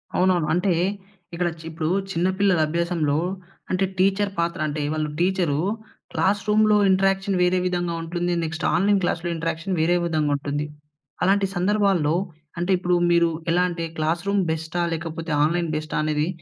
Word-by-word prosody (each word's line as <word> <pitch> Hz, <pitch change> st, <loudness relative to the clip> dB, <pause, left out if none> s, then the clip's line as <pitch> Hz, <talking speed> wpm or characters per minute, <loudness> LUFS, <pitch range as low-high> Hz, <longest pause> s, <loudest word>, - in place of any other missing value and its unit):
అవునవును. 180 Hz, -4 st, +2 dB
అంటే, 180 Hz, +1 st, +2 dB, 0.6 s
ఇక్కడ 175 Hz, +1 st, 0 dB
చి 160 Hz, -, -12 dB
ఇప్పుడు 155 Hz, -1 st, -3 dB, 0.2 s
చిన్న 170 Hz, +1 st, +1 dB
పిల్లల 195 Hz, -4 st, +3 dB
అభ్యాసంలో, 165 Hz, -3 st, 0 dB, 0.5 s
అంటే 185 Hz, +1 st, +2 dB
టీచర్ 195 Hz, +2 st, +2 dB
పాత్ర 170 Hz, +1 st, -1 dB
అంటే, 150 Hz, 0 st, -3 dB
వాళ్ళు 155 Hz, -1 st, -1 dB
టీచరూ 175 Hz, -5 st, +1 dB, 0.5 s
క్లాస్ 200 Hz, +1 st, +1 dB
రూమ్‌లో 215 Hz, 0 st, +4 dB
ఇంటరాక్షన్ 195 Hz, 0 st, +2 dB
వేరే 180 Hz, +1 st, +3 dB
విధంగా 175 Hz, -1 st, -1 dB
ఉంటుంది. 175 Hz, +1 st, -2 dB
నెక్స్ట్ 160 Hz, +1 st, -3 dB
ఆన్‌లైన్ 200 Hz, +2 st, +3 dB
క్లాస్‌లో 175 Hz, 0 st, -1 dB
ఇంటరాక్షన్ 165 Hz, +3 st, -2 dB
వేరే 175 Hz, +2 st, +3 dB
విధంగా 155 Hz, -3 st, 0 dB
ఉంటుంది. 145 Hz, +1 st, -3 dB, 0.6 s
అలాంటి 195 Hz, +1 st, +3 dB
సందర్భాల్లో 190 Hz, -5 st, +2 dB, 0.4 s
అంటే, 175 Hz, +2 st, 0 dB
ఇప్పుడు 180 Hz, 0 st, +1 dB, 0.2 s
మీరు 170 Hz, -1 st, +4 dB, 0.2 s
ఎలా 175 Hz, +2 st, +3 dB
అంటే 170 Hz, -1 st, -4 dB
క్లాస్ 160 Hz, +2 st, 0 dB
రూమ్ 200 Hz, -1 st, +2 dB
బెస్టా? 160 Hz, +2 st, -3 dB
లేకపోతే 165 Hz, 0 st, -5 dB
ఆన్‌లైన్ 170 Hz, +1 st, +1 dB
బెస్టా? 155 Hz, 0 st, -4 dB
అనేది 155 Hz, 0 st, 0 dB
175 Hz, 150 wpm, -23 LUFS, 160-190 Hz, 0.6 s, రూమ్‌లో